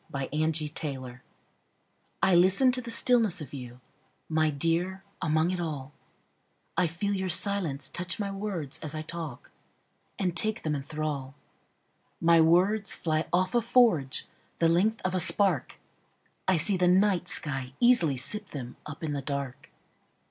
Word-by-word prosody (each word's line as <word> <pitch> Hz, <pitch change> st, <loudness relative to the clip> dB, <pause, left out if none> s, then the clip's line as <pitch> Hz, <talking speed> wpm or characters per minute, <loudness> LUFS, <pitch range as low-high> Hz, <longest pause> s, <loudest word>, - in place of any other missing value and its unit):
Listening 145 Hz, -2 st, -3 dB, 1.0 s
I 190 Hz, -, +4 dB
LISTEN 190 Hz, +9 st, +4 dB
to 255 Hz, 0 st, -1 dB
the 240 Hz, -, -9 dB
stillness 230 Hz, -5 st, +3 dB
of 150 Hz, -4 st, -9 dB
you, 125 Hz, -2 st, -9 dB, 0.5 s
My 155 Hz, 0 st, +1 dB
dear, 170 Hz, +6 st, -1 dB, 0.2 s
among 155 Hz, +2 st, +1 dB
it 185 Hz, -, -3 dB
all;I 155 Hz, +3 st, -7 dB
feel 175 Hz, +5 st, -3 dB
your 190 Hz, -1 st, -2 dB
silence 170 Hz, -7 st, +3 dB
touch 180 Hz, +6 st, -3 dB
my 200 Hz, -1 st, -3 dB
words 195 Hz, -8 st, -4 dB
as 155 Hz, 0 st, -4 dB
I 155 Hz, -, -4 dB
talk, 155 Hz, -5 st, -7 dB, 0.7 s
And 180 Hz, -3 st, -2 dB
take 215 Hz, +6 st, 0 dB
them 155 Hz, -, -1 dB
in 140 Hz, -, -3 dB
thrall.My 150 Hz, +3 st, -3 dB
words 190 Hz, +6 st, +3 dB
fly 155 Hz, -1 st, -2 dB
off 185 Hz, +1 st, 0 dB
a 240 Hz, -, +3 dB
forgeThe 220 Hz, -, +2 dB, 0.4 s
length 180 Hz, +7 st, +2 dB
of 185 Hz, -, -1 dB
a 185 Hz, -, 0 dB
spark;I 185 Hz, 0 st, 0 dB
see 195 Hz, +4 st, +3 dB
the 180 Hz, 0 st, +2 dB
night 185 Hz, 0 st, +2 dB
sky 135 Hz, -6 st, +2 dB
easily 235 Hz, -, +3 dB
sip 210 Hz, +11 st, -2 dB
themUp 140 Hz, +3 st, -9 dB
in 150 Hz, -2 st, -3 dB
the 140 Hz, -, -3 dB
dark. 140 Hz, -1 st, -5 dB
165 Hz, 135 wpm, -27 LUFS, 145-190 Hz, 1.0 s, I